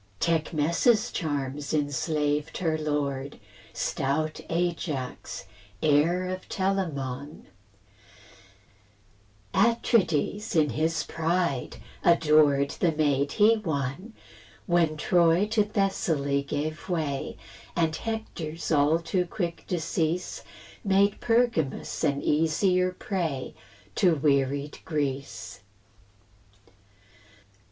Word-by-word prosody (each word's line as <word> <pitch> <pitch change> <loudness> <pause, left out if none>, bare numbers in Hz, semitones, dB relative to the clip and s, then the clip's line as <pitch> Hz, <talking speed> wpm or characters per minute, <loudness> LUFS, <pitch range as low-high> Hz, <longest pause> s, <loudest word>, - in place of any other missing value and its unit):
Tecmessa's 170 +7 +2
charms 145 -2 -2
enslaved 150 +1 -1
her 160 -3 0
lord, 145 -3 -2 0.3
Stout 155 +3 -1
Ajax, 155 - -3 0.4
heir 160 +5 +3
of 185 0 -5
Telamon; 150 -8 -2 2.1
Atrides, 205 - +2
in 150 -3 +3
his 155 +5 0
pride, 165 -4 -1 0.3
adored 150 -4 +4
The 170 - +1
maid 145 -2 +1
he 220 +1 +5
won, 160 - -3 0.5
When 170 -3 +2
Troy 170 +3 +3
to 215 -1 +3
Thessaly 170 -9 0
gave 155 +5 -3
way, 155 -6 -2 0.4
And 160 -2 +1
Hector's 170 -9 -4
all 150 +1 +4
too 175 +2 -1
quick 170 -2 -4
decease 165 0 -1 0.4
Made 200 0 +2
Pergamus 230 - 0
an 140 -2 +1
easier 180 +4 +2
prey 170 -8 -3 0.4
To 175 -3 +4
wearied 140 0 0
Greece. 140 -3 -3
160 Hz, 85 wpm, -27 LUFS, 145-180 Hz, 2.1 s, he